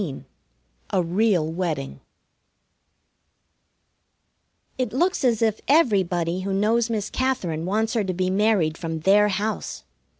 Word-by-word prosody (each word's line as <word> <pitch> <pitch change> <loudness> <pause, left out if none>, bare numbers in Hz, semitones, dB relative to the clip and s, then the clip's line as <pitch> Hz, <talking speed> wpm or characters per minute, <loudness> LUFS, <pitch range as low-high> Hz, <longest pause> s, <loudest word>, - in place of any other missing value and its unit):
XV 150 -9 -5 0.7
A 185 - +1
REAL 175 -2 +1
WEDDING 160 - -3 2.8
It 250 -4 -1
looks 350 +5 +1
as 235 -3 +2
if 220 -1 0
everybody 185 - +2
who 195 +1 -3
knows 225 +4 +1
Miss 215 -3 -3
Katherine 180 -12 -1
wants 220 +4 0
her 225 -3 +1
to 185 -1 -2
be 185 +1 0
married 190 -6 +1
from 160 -2 -4
their 205 +4 +4
house. 210 +2 -3
200 Hz, 125 wpm, -23 LUFS, 175-225 Hz, 2.8 s, their